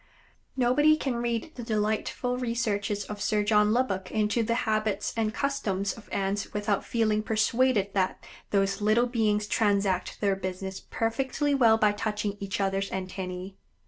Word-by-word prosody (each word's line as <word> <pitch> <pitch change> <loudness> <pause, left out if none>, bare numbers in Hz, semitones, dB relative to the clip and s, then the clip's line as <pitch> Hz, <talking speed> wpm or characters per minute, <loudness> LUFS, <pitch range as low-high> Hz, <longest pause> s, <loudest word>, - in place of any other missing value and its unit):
Nobody 295 +5 +4
can 265 -5 -2
read 235 +5 -2
the 245 - -7
delightful 220 +3 -1
researches 210 -4 -1
of 210 -1 -7
Sir 210 -1 +1
John 210 0 +4
Lubbock 205 -6 0
into 215 +2 +1
the 230 +1 0
habits 215 -2 0
and 220 -2 0
customs 205 -8 -1
of 220 -3 -14
Ants 195 +1 -2
without 205 -1 0
feeling 215 -2 +1
persuaded 220 -1 +1
that 190 -2 -1 0.2
those 195 +1 +1
little 215 +3 +3
beings 215 -4 +1
transact 200 -4 +1
their 200 -2 +2
business 190 0 -5
perfectly 265 +5 -1
well 230 -5 +5
by 215 -1 +4
touching 210 -1 -2
each 200 0 -3
other's 195 0 0
antennæ. 185 0 -5
210 Hz, 145 wpm, -28 LUFS, 200-230 Hz, 0.2 s, well